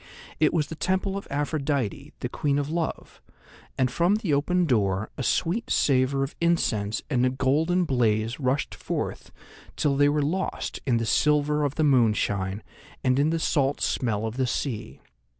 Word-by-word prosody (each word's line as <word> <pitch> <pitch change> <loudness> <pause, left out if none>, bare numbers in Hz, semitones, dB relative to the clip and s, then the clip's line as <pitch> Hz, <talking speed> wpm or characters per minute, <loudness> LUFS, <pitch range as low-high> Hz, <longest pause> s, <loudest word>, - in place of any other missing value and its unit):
It 155 -1 +4
was 160 -4 +1
the 160 - -8
Temple 190 +3 -1
of 200 - -5
Aphrodite, 140 -5 -2
the - - -1
Queen 145 -1 -1
of 145 +1 -2
Love, 165 -1 -4 0.6
and 130 -2 +1
from 175 +8 +2
the 205 -8 -1
open 180 +6 +2
door 105 - 0
a - - -5
sweet 175 - 0
savour 135 0 +2
of 135 - -4
incense 110 -12 +1
and 125 -4 +1
a 130 - +4
golden 150 +8 +1
blaze 115 -5 0
rushed 135 +1 0
forth - - -4 0.4
till 145 -2 +1
they 145 +1 +4
were 150 0 +1
lost 185 +6 -2
in 120 -3 +3
the 115 - -1
silver 150 +4 +2
of 145 -1 -1
the 155 - +1
moonshine 105 -7 +1 0.4
and 130 +1 +2
in 145 +2 +3
the 165 - 0
salt 145 -3 +1
smell 110 -3 -1
of 110 +2 -4
the 130 -1 +1
sea. 110 - -4
140 Hz, 170 wpm, -26 LUFS, 125-155 Hz, 0.6 s, It